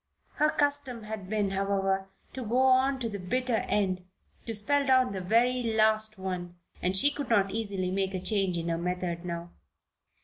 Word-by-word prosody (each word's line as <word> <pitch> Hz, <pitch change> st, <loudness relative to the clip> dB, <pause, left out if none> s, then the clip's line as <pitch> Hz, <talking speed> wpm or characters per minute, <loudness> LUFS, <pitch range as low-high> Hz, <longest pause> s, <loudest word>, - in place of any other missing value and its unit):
Her 300 Hz, +1 st, +4 dB
custom 285 Hz, -5 st, 0 dB
had 210 Hz, -3 st, -7 dB
been, 205 Hz, -2 st, 0 dB
however, 195 Hz, 0 st, 0 dB, 0.2 s
to 260 Hz, -, -5 dB
go 235 Hz, +2 st, -1 dB
on 260 Hz, +1 st, +4 dB
to 235 Hz, -, -1 dB
the 205 Hz, -2 st, -5 dB
bitter 250 Hz, +6 st, -1 dB
end 190 Hz, -4 st, 0 dB, 0.4 s
to 225 Hz, -, -1 dB
spell 285 Hz, +8 st, +3 dB
down 260 Hz, -3 st, +3 dB
the 190 Hz, -1 st, -4 dB
very 240 Hz, +6 st, +2 dB
last 220 Hz, -2 st, +2 dB
one, 180 Hz, -2 st, -5 dB, 0.3 s
and 185 Hz, +1 st, +1 dB
she 285 Hz, +9 st, +6 dB
could 285 Hz, -2 st, -5 dB
not 200 Hz, -4 st, +3 dB
easily 200 Hz, -4 st, -2 dB
make 190 Hz, 0 st, -1 dB
a -, -, -2 dB
change 190 Hz, -2 st, 0 dB
in 170 Hz, 0 st, -3 dB
her 165 Hz, 0 st, -1 dB
method 180 Hz, -1 st, -3 dB
now. 170 Hz, -1 st, -5 dB
205 Hz, 180 wpm, -29 LUFS, 185-245 Hz, 0.4 s, she